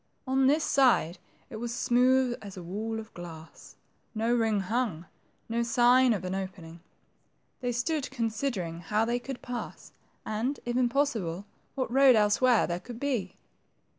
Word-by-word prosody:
On 265 0 +2
this 300 +3 +3
side, 235 - +3 0.3
it 220 - -6
was 235 +1 -4
smooth 250 +1 +2
as 200 -2 -9
a 180 - -7
wall 220 +6 -4
of 220 0 -11
glass; 165 -2 -11 0.4
no 225 +2 +1
ring 225 -4 +2
hung; 200 -4 -2 0.4
no 230 +1 -1
sign 245 +2 +4
of 195 -5 -1
an 185 - -3
opening. 185 -3 -6 0.8
They 245 -2 -2
stood 280 +5 -1
considering 225 -8 -3
how 210 +6 0
they 240 +1 0
could 265 +1 -7
pass, 245 -1 -7 0.3
and, 230 +6 -2
if 240 0 -2
impossible, 235 - 0 0.3
what 260 -4 -2
road 270 -2 +7
elsewhere 220 +3 +4
thqre 175 +1 -4
could 240 -2 -9
be. 245 -10 -2
230 Hz, 150 wpm, -28 LUFS, 195-255 Hz, 0.8 s, road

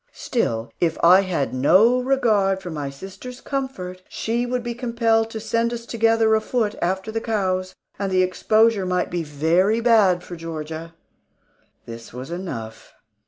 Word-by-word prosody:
Still, 115 - -2
if 165 -2 +1
I 180 +3 +7
had 180 -8 -2
no 190 - +4
regard 220 -8 +2
for 180 -2 -7
my 145 -3 -4
sister's 195 - -10
comfort, 225 -10 -5
she 235 +2 -2
would 250 0 -2
be 240 0 -3
compelled 230 -2 +1
to 225 - -6
send 230 +2 0
us 235 -1 -6
together 225 -1 +2
afoot 220 0 0
after 190 +4 -1
the 225 +1 -2
cows, 185 -5 -1 0.2
and 200 -1 -2
the 185 0 +3
exposure 215 +2 +2
might 180 -1 -1
be 175 0 -1
very 165 +8 +1
bad 210 -7 +4
for 175 - -8
Georgia. 165 0 -7 0.9
This 115 0 -10
was 130 +5 -7
enough. 135 -12 -7
195 Hz, 155 wpm, -22 LUFS, 170-230 Hz, 0.9 s, I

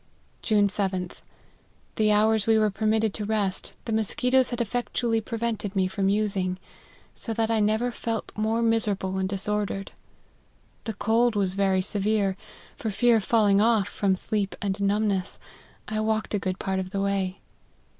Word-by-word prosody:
" - - -37
June 205 -1 +5
7th. 190 -3 -2 0.7
The 215 -1 +3
hours 215 0 +3
we 225 -1 +5
were 215 -1 +2
permitted 220 +1 +1
to 215 - -4
rest, 205 -3 -2
the 230 - -4
musquitoes 250 +4 +2
had 240 - -4
effectually 235 0 -1
prevented 220 -3 -3
me 190 -1 +2
from 195 +1 0
using; 195 -3 0 0.6
so 225 - -4
that 225 0 0
I 225 - +2
never 220 +4 +1
felt 225 -1 -4
more 220 +2 0
miserable 205 -4 0
and 190 0 -1
disordered; 200 0 0 0.9
the 225 -3 -4
cold 230 +3 +2
was 195 -3 +1
very 190 -1 +1
severe; 205 -1 0 0.4
for 220 - -4
fear 235 +3 +3
of 215 - -2
falling 205 -2 +3
off, 220 -3 +3
from 195 -2 +1
sleep 200 +1 -1
and 200 0 -2
numbness, 200 -1 0 0.5
I 215 0 -2
walked 220 0 -1
a 205 - +1
good 185 -1 -3
part 190 -1 -2
of 185 -1 -4
the 195 +1 -2
way. 195 -1 -1
210 Hz, 165 wpm, -26 LUFS, 195-220 Hz, 0.9 s, June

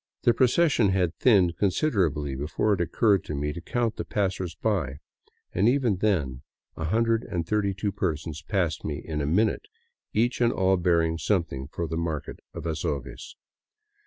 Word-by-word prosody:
The 120 - +5
procession 130 - +3
had 90 -3 +1
thinned 95 -8 +4
considerably 90 - +1
before 75 +10 0
it 95 - 0
occurred 100 +2 +2
to 75 - -4
me 75 +1 -2
to 85 - -7
count 115 +4 -1
the - - -2
passersby, 95 -4 -1 0.6
and 100 +6 +3
even 125 -7 +2
then 75 -11 0 0.3
132 100 0 0
persons 80 -4 -3
passed 90 -5 -1
me 75 -2 -3
in 75 -1 -4
a 70 - -1
minute, 105 - +1 0.4
each 120 +3 +1
and 120 -1 +4
all 95 -2 +2
bearing 85 -2 +2
something 85 -10 -1
for 85 - -4
the 80 - -3
market 80 -3 -3
of 85 - -7
Azogues. 75 -5 -4
90 Hz, 145 wpm, -26 LUFS, 80-105 Hz, 0.6 s, The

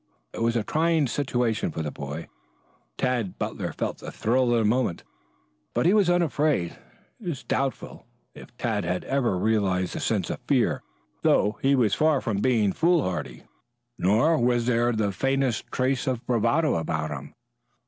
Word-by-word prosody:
It - - -6
was 115 +1 +1
a 115 - +1
trying 160 +4 +2
situation 120 -4 0
for 80 - -4
a 75 - -3
boy. 70 +4 -6 0.7
Tad 120 -7 -1
Butler - - -3
felt - - -4
the - - -7
thrill 125 +2 +1
of 120 - +3
the 115 - +2
moment, 110 -5 0 0.7
but - - +1
he 180 - +5
was 205 -4 +4
unafraid. 155 - +1 0.4
It 205 - -10
is 140 -6 -3
doubtful 135 +1 -3 0.3
if - - -12
Tad - - -1
ever 120 +7 0
had 90 - -2
realized 95 -5 +1
a - - -3
sense - - -1
of - - -5
fear, - - +2 0.4
though 105 - +2
he 140 +1 +4
was 115 -6 +2
far 155 -2 +3
from 110 -5 -2
being 105 -4 +2
foolhardy, 90 - 0 0.5
nor 115 - +3
was 120 -1 +2
there 120 0 +2
the 110 -3 0
faintest 135 +1 0
trace 130 0 0
of 125 -3 -2
bravado 125 - +2
about 80 -1 -2
him. 70 0 -7
120 Hz, 165 wpm, -26 LUFS, 100-135 Hz, 0.7 s, he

